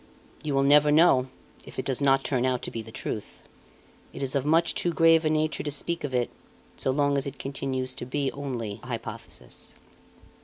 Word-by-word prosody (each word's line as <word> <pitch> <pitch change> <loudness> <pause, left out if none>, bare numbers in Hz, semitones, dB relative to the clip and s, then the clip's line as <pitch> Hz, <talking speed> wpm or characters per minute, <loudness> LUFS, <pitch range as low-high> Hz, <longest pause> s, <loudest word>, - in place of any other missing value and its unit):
"You 150 -3 -2
will 135 - +3
never 150 +1 +6
know 150 -5 +5 0.4
if - - -12
it - - -2
does 135 0 -1
not 135 -1 +4
turn 130 -3 0
out 130 -1 0
to - - -4
be 115 - -4
the 110 0 -11
truth. 65 - -6 0.7
It - - -5
is 135 - -1
of 140 0 0
much 165 +2 +3
too 175 - 0
grave 165 -1 +5
a - - +3
nature 155 0 +1
to 150 - -3
speak 165 +4 -3
of 145 - -3
it, 125 -2 0 0.4
so - - -2
long 140 +1 +2
as 135 - -3
it 140 0 -6
continues 130 -1 -3
to 120 - -6
be 140 +1 -1
only 120 -7 -4
a - - -12
hypothesis." 115 -1 -7
135 Hz, 205 wpm, -27 LUFS, 125-150 Hz, 0.7 s, never